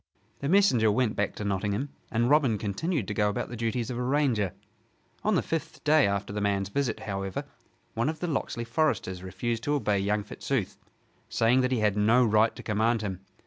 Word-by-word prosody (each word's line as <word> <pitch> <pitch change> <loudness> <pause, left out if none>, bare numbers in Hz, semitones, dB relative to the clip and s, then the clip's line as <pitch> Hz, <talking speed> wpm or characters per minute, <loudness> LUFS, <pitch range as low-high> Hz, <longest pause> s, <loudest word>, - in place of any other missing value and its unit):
The 140 - -2
messenger 135 - +4
went 110 0 +1
back 105 - -1
to - - -5
Nottingham; 100 +6 -1 0.2
and 115 +1 +2
Robin 135 -6 +3
continued 110 - -2
to 105 - -2
go 105 0 +2
about 105 - -3
the 120 - -6
duties 115 +2 -2
of 120 - -4
a - - -1
ranger. 125 -8 +1 0.7
On 215 -1 +2
the - - +2
fifth 165 -1 -4
day 150 -3 +5
after 100 0 -2
the 105 - -2
man's 100 -1 0
visit, 125 +1 -1
however, 95 -2 -3 0.5
one 115 +6 0
of 155 -1 -4
the 180 - -2
Locksley 135 -7 -2
foresters 115 - 0
refused 95 +6 -3
to 145 - +1
obey 105 -8 +1
young 105 +1 0
Fitzooth, 110 0 -3 0.5
saying 120 +3 +3
that 130 0 0
he 125 -4 +1
had 105 -2 +2
no 115 +4 +4
right 110 +1 +3
to - - -9
command 110 +1 +1
him. 95 -3 -3
115 Hz, 200 wpm, -28 LUFS, 105-135 Hz, 0.7 s, day